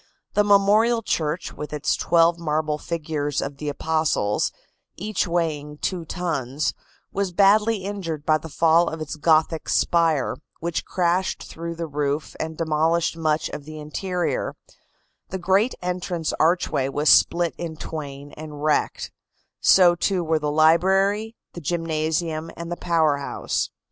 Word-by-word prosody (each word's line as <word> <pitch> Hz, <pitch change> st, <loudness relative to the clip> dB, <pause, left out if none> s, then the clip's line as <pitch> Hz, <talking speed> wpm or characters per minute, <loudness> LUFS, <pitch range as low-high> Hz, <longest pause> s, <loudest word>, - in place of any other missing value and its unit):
The 210 Hz, -, +4 dB
memorial 210 Hz, +3 st, +4 dB
church, 160 Hz, -1 st, -2 dB
with 150 Hz, -, -7 dB
its 150 Hz, -1 st, 0 dB
twelve 170 Hz, 0 st, +3 dB
marble 155 Hz, -2 st, -1 dB
figures 150 Hz, -4 st, -2 dB
of 140 Hz, 0 st, -4 dB
the 150 Hz, +1 st, -4 dB
apostles, 155 Hz, -9 st, 0 dB, 0.4 s
each 205 Hz, 0 st, -2 dB
weighing 155 Hz, -4 st, -2 dB
two 175 Hz, +1 st, -3 dB
tons, 155 Hz, -5 st, -2 dB, 0.4 s
was 195 Hz, -1 st, -1 dB
badly 205 Hz, +2 st, +4 dB
injured 175 Hz, -7 st, -4 dB
by 155 Hz, -1 st, +3 dB
the 160 Hz, -, -9 dB
fall 165 Hz, +2 st, +3 dB
of 160 Hz, -, -6 dB
its 155 Hz, 0 st, -5 dB
Gothic 160 Hz, +1 st, +2 dB
spire, 165 Hz, -5 st, +2 dB, 0.2 s
which 170 Hz, -1 st, -3 dB
crashed 180 Hz, +1 st, 0 dB
through 170 Hz, +1 st, -6 dB
the 165 Hz, 0 st, -4 dB
roof 145 Hz, 0 st, -2 dB
and 160 Hz, 0 st, -4 dB
demolished 160 Hz, +1 st, +1 dB
much 155 Hz, -1 st, 0 dB
of 145 Hz, -, -7 dB
the 155 Hz, 0 st, -9 dB
interior; 175 Hz, +4 st, -2 dB, 0.7 s
the 190 Hz, -, -3 dB
great 190 Hz, +7 st, +2 dB
entrance 180 Hz, -2 st, -2 dB
archway 160 Hz, -5 st, +2 dB
was 145 Hz, +2 st, -2 dB
split 170 Hz, +1 st, +5 dB
in 165 Hz, -2 st, -4 dB
twain 145 Hz, -3 st, -7 dB
and 150 Hz, -1 st, -9 dB
wrecked; 155 Hz, -1 st, 0 dB, 0.5 s
so, 180 Hz, -2 st, +6 dB
too, 180 Hz, +1 st, 0 dB
were 160 Hz, -1 st, +1 dB
the 150 Hz, -1 st, -1 dB
library, 190 Hz, +8 st, +3 dB, 0.2 s
the 175 Hz, -, -8 dB
gymnasium 160 Hz, 0 st, -1 dB
and 170 Hz, 0 st, -6 dB
the -, -, -1 dB
power 160 Hz, -5 st, +2 dB
house. 140 Hz, -, -2 dB
165 Hz, 145 wpm, -23 LUFS, 150-175 Hz, 0.7 s, so